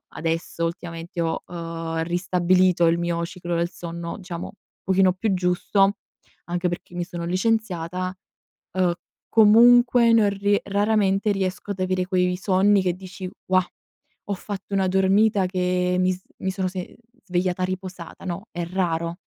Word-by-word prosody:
adesso 165 +1 -3
ultimamente 165 0 -5
ho, 165 -1 -1
uhm, 165 -1 -4
ristabilito 180 0 +2
il 165 +1 +3
mio 170 -1 -1
ciclo 175 -1 -5
del 170 +1 0
sonno 170 -1 -6
diciamo, 180 -2 -7 0.3
pochino 190 -1 +3
più 195 +2 -1
giusto, 185 +2 +2 0.5
anche 175 +1 -1
perché 175 0 -6
mi 175 0 -2
sono 175 -1 -6
licenziata, 185 -2 -1 0.6
uhm, 185 -2 +2 0.4
comunque 235 +2 +6
non 220 -2 +5
rie 200 +1 +1
raramente 205 0 +1
riesco 195 +1 -3
ad 190 - -9
avere 185 0 0
quei 180 -1 +1
sonni 195 +1 +3
che 180 -2 0
dici: 185 +1 -8 0.2
"Wah! 185 0 +3 0.6
Ho 205 - -1
fatto 200 +1 -6
una 190 -1 +2
dormita 195 +2 +3
che, 180 0 0
mi 185 0 +3
s 185 0 -8 0.2
mi 190 - -2
sono 190 -1 -2
se 185 0 -4
mhmm, - - -18 0.3
svegliata 180 -1 -1
riposata", 185 -2 -6
no; 190 +4 -5
è 175 0 -3
raro 170 -2 -1
185 Hz, 150 wpm, -24 LUFS, 175-195 Hz, 0.6 s, comunque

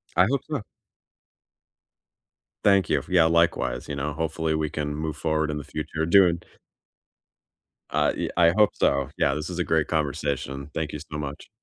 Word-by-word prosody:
I 90 - +6
hope 140 - +1
so. 140 -9 -3 2.0
Thank 100 -2 +4
you. 70 -3 +1
Yeah, 90 -3 +4
likewise. 85 -7 +1
You 70 - -4
know, 75 +1 -3
hopefully, 80 0 -1
we 75 -1 -1
can 75 0 -3
move 80 -1 -3
forward 80 -1 0
in 75 - -3
the 75 - -5
future 80 +2 -3
doing 85 -1 +5 1.5
I - - +2
yea - - -3
I 85 -1 +6
hope 105 -1 +5
so. 70 -1 +1
Yeah, 70 - +2
this 75 +3 -4
is 90 0 -5
a - - +2
great 80 -2 +1
conversation. 70 -2 -2
Thank 80 -2 -2
you 75 - -4
so 75 +2 -7
much. 70 -1 -6
80 Hz, 170 wpm, -25 LUFS, 75-85 Hz, 2.0 s, I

